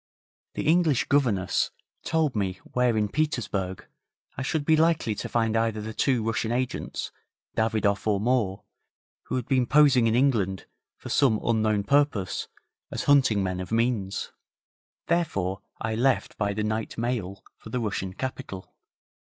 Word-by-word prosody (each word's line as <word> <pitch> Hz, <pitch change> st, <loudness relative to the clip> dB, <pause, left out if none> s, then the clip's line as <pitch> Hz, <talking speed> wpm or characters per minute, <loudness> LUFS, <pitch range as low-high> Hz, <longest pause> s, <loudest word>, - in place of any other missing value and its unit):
The -, -, -3 dB
English 160 Hz, -5 st, +3 dB
governess 115 Hz, -10 st, +2 dB, 0.3 s
told 155 Hz, -5 st, +1 dB
me 95 Hz, -3 st, -1 dB
where 125 Hz, -2 st, +1 dB
in 105 Hz, -1 st, +2 dB
Petersburg 105 Hz, -, -2 dB, 0.5 s
I -, -, -5 dB
should 145 Hz, +2 st, -1 dB
be 160 Hz, -, +5 dB
likely 160 Hz, -7 st, +2 dB
to -, -, -5 dB
find 115 Hz, -1 st, +1 dB
either 115 Hz, -1 st, +1 dB
the 110 Hz, +1 st, -5 dB
two 125 Hz, -1 st, +1 dB
Russian 115 Hz, 0 st, -1 dB
agents, 125 Hz, +1 st, -3 dB, 0.4 s
Davidoff 110 Hz, -2 st, +1 dB
or 105 Hz, -2 st, +2 dB
Moore, 110 Hz, -4 st, 0 dB, 0.6 s
who -, -, -3 dB
had 125 Hz, -3 st, -2 dB
been 130 Hz, -3 st, +2 dB
posing 140 Hz, -5 st, +5 dB
in 115 Hz, -, +2 dB
England 110 Hz, -8 st, +1 dB, 0.3 s
for -, -, -9 dB
some 125 Hz, -7 st, +3 dB
unknown 110 Hz, -3 st, +1 dB
purpose 140 Hz, -8 st, +1 dB, 0.4 s
as -, -, -3 dB
hunting 130 Hz, -8 st, +4 dB
men 90 Hz, -1 st, -2 dB
of 90 Hz, +1 st, -6 dB
means; 115 Hz, -4 st, 0 dB, 0.7 s
therefore 100 Hz, -, 0 dB, 0.2 s
I 110 Hz, 0 st, -2 dB
left 125 Hz, +4 st, +1 dB
by 100 Hz, -1 st, -1 dB
the 105 Hz, -, -1 dB
night 110 Hz, +1 st, -2 dB
mail 115 Hz, -5 st, -3 dB, 0.2 s
for -, -, -11 dB
the 125 Hz, -, -2 dB
Russian 100 Hz, -4 st, -3 dB
capital. 130 Hz, -7 st, -6 dB
115 Hz, 150 wpm, -26 LUFS, 105-130 Hz, 0.7 s, be